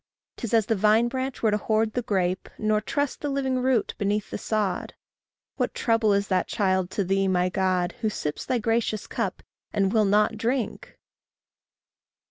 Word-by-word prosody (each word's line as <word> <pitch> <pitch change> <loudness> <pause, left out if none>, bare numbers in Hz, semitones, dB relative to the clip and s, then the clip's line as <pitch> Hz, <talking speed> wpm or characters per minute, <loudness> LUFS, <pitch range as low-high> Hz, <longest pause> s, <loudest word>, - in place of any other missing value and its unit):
'Tis 230 - -4
as 225 -3 +4
the 225 - +1
vine 215 +3 +4
branch 260 +1 -4
were 220 - +4
to 210 - +2
hoard 220 +1 +1
the 245 - 0
grape, 190 -5 -1
Nor 215 0 +1
trust 285 +5 -2
the 290 - -2
living 265 -2 0
root 255 -3 +1
beneath 205 +1 -1
the - - -3
sod. 210 -4 -2 0.6
What - - -1
trouble 225 -2 +2
is 200 0 +1
that 185 -2 +1
child 190 -3 +1
to 200 - +2
thee, 195 +1 +1
my 180 -1 +2
God, 185 -1 +1
Who 220 - +1
sips 150 -7 -4
thy 250 - 0
gracious 225 -1 0
cup, - - -3 0.3
and 195 -2 +1
will 215 -2 +4
not 210 +2 +3
drink! 235 +2 -2
215 Hz, 175 wpm, -26 LUFS, 195-230 Hz, 0.6 s, as